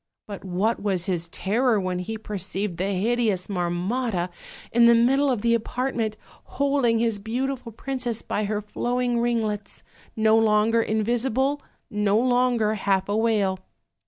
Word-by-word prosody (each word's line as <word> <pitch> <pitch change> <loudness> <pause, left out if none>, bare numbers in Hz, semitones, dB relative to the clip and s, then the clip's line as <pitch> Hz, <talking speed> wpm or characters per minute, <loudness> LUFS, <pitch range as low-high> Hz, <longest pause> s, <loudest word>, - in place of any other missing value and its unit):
But 200 -2 -8
what 195 +5 -1
was 190 -4 0
his 175 -3 -1
terror 220 +6 +1
when 185 -1 -2
he 220 +5 -4
perceived 195 -3 -3
the 185 - -1
hideous 210 -2 0
Marmotta, 185 +2 -1 0.4
in 235 0 +5
the 235 - +7
middle 270 +5 +3
of 245 -6 -1
the 235 0 +3
apartment, 230 -1 -1 0.4
holding 275 -4 +2
his 225 -2 0
beautiful 245 +3 -3
princess 245 -1 -3
by 210 - -2
her 210 +1 -2
flowing 240 +3 -1
ringlets: 220 -4 -2 0.3
no 220 0 +4
longer 220 +1 +3
in 220 -1 0
visible, 265 +5 0 0.3
no 210 0 +2
longer 245 -3 +2
half 195 -2 0
a 205 - +1
whale. 210 -4 +1
220 Hz, 145 wpm, -24 LUFS, 200-240 Hz, 0.4 s, the